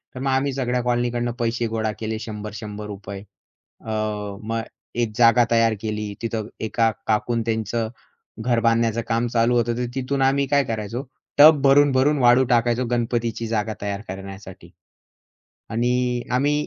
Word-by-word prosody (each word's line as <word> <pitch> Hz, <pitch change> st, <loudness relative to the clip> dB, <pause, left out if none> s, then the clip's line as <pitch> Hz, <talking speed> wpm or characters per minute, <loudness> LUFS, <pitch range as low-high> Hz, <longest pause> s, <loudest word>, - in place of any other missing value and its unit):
तर -, -, -6 dB
मग 135 Hz, +1 st, -1 dB
आम्ही 135 Hz, +1 st, +1 dB
सगळ्या 125 Hz, -2 st, -1 dB
कॉलनीकडून 120 Hz, 0 st, 0 dB
पैसे 115 Hz, 0 st, 0 dB
गोळा 110 Hz, -1 st, -1 dB
केले 110 Hz, 0 st, -3 dB
₹100-100. 105 Hz, -2 st, -7 dB, 0.6 s
अ, -, -, -9 dB, 0.5 s
मग 115 Hz, +1 st, -2 dB, 0.4 s
एक 115 Hz, -2 st, 0 dB
जागा 120 Hz, 0 st, +6 dB
तयार 115 Hz, -1 st, +4 dB
केली. 105 Hz, -1 st, -3 dB
तिथं 110 Hz, -2 st, -3 dB, 0.2 s
एका 115 Hz, +1 st, +2 dB, 0.2 s
काकूनं 115 Hz, +2 st, +1 dB
त्यांचं 110 Hz, 0 st, -1 dB, 0.5 s
घर 120 Hz, +1 st, +1 dB
बांधण्याचं 115 Hz, 0 st, +2 dB
काम 115 Hz, +1 st, +1 dB
चालू 115 Hz, +1 st, +3 dB
होतं. 120 Hz, 0 st, +1 dB
तर 125 Hz, -, -1 dB
तिथून 135 Hz, +1 st, -1 dB
आम्ही 135 Hz, +1 st, +3 dB
काय 140 Hz, +1 st, +3 dB
करायचो 115 Hz, +2 st, -4 dB, 0.3 s
टब 150 Hz, 0 st, +8 dB
भरून-भरून 140 Hz, +1 st, +4 dB
वाळू 125 Hz, +1 st, +5 dB
टाकायचो 120 Hz, 0 st, +2 dB
गणपतीची 115 Hz, -1 st, -1 dB
जागा 110 Hz, -1 st, -1 dB
तयार 100 Hz, 0 st, -3 dB
करण्यासाठी. 95 Hz, -1 st, -9 dB, 1.0 s
आणि 125 Hz, +1 st, 0 dB
आम्ही 145 Hz, +4 st, +1 dB
115 Hz, 140 wpm, -23 LUFS, 110-125 Hz, 1.0 s, टब